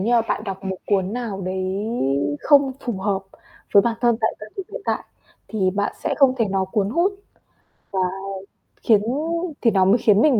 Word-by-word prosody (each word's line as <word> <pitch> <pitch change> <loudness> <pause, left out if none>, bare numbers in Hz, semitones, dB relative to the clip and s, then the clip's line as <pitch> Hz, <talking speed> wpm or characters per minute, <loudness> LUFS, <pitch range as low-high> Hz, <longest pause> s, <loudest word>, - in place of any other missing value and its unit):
như 230 +5 +1
mà 235 - +5
bạn 215 - -1
đọc 195 -1 -6
một 190 -1 -2
cuốn 195 -1 +1
nào 230 -5 -4
đấy 185 0 -2 0.8
không 280 -2 +4
phù 240 - -3
hợp 195 -1 -1 0.5
với 200 - +7
bản 230 0 0
thân 240 -2 +3
tại 220 - +1
thời 215 - -8
điểm 390 - -4
hiện - - -5
tại, - - -1 0.4
thì 190 -4 +1
bạn 205 +2 -1
sẽ - - +1
không 270 -3 +5
thể 230 - +2
nó 195 0 +1
cuốn 200 +1 -1
hút 345 - +2 0.8
và 190 - -1 0.8
khiến 215 -3 +5 0.6
thì 230 - +4
nó 190 -2 +4
mới 200 +5 +5
khiến 210 -3 +4
mình 270 -5 +5
215 Hz, 195 wpm, -22 LUFS, 195-240 Hz, 0.8 s, với